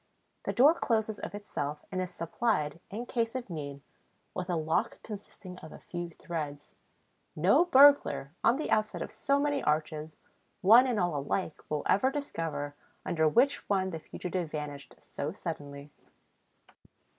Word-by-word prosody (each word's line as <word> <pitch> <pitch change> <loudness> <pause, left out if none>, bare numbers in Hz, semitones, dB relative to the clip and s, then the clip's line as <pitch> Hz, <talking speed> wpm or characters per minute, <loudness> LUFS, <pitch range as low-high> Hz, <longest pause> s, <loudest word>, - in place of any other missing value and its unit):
The - - 0
door 265 - +7
closes 220 -8 0
of - - -6
itself 150 -8 -4
and 185 -1 -1
is 185 - -3
supplied, 170 -3 -1
in 225 +5 -5
case 230 -1 -1
of 245 -7 -4
need, 140 -3 -6 0.5
with 180 0 -4
a 175 - +1
lock 160 0 0
consisting 195 -3 -9
of 155 - -11
a - - -10
few 175 -1 -6
threads. 150 -3 -6 0.6
No 350 - +5
burglar, 285 - +6
on 240 - +4
the 310 - -3
outside 215 0 +1
of - - -8
so 280 0 +1
many 285 -1 +1
arches, 155 0 -1 0.5
one 230 +6 +8
and 240 -4 0
all 175 -4 +1
alike, 150 +4 -2
will 150 -1 -1
ever 255 +7 +3
discover 165 - -3 0.3
under 160 -2 +2
which 255 - +2
one 190 -2 +1
the 165 - -4
fugitive 180 +1 -4
vanished 150 -2 -6
so 150 +3 -5
suddenly. 145 -6 -7
180 Hz, 155 wpm, -30 LUFS, 150-230 Hz, 0.6 s, one